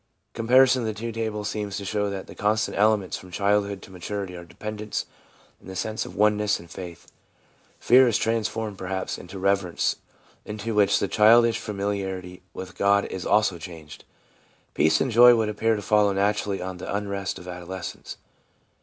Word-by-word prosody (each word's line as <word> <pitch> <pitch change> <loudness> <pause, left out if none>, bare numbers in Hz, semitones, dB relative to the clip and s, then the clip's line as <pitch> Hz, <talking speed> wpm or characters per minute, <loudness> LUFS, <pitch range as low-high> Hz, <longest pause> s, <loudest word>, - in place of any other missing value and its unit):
Comparison 125 +3 +4
of 115 - -2
the 110 - -3
two 115 +2 -4
tables 110 -2 -3
seems 105 -1 -3
to 100 - -6
show 105 0 -1
that 95 -1 -5
the - - -11
constant 110 +2 0
elements 105 -2 +2
from 95 - -13
childhood 100 +1 0
to - - -13
maturity 95 +1 -5
are 85 - -8
dependence 105 +4 -5 0.5
and - - -13
the 95 - -7
sense 110 +4 -3
of - - -11
oneness 105 0 +2
and 85 -1 -14
faith. 85 -2 -9 0.7
Fear 130 +1 +6
is 115 - +2
transformed, 110 -2 -2
perhaps, 95 0 -3
into 95 +2 -10
reverence, 95 -2 0 0.5
into 110 +2 -5
which 105 -1 +4
the 100 - 0
childish 115 +3 +5
familiarity 95 -3 -4
with 95 +1 -8
God 100 0 +3
is 95 - -5
also 105 -5 +2
changed. 80 -4 -10 0.7
Peace 80 +1 +3
and 130 - 0
joy 120 +2 +8
would 110 -2 0
appear 110 +2 +1
to 105 - -5
follow 105 0 +3
naturally 100 -1 0
on 95 0 -5
the - - -6
unrest 100 -1 -3
of 90 - -11
adolescence. 90 0 -7
100 Hz, 170 wpm, -25 LUFS, 95-110 Hz, 0.7 s, joy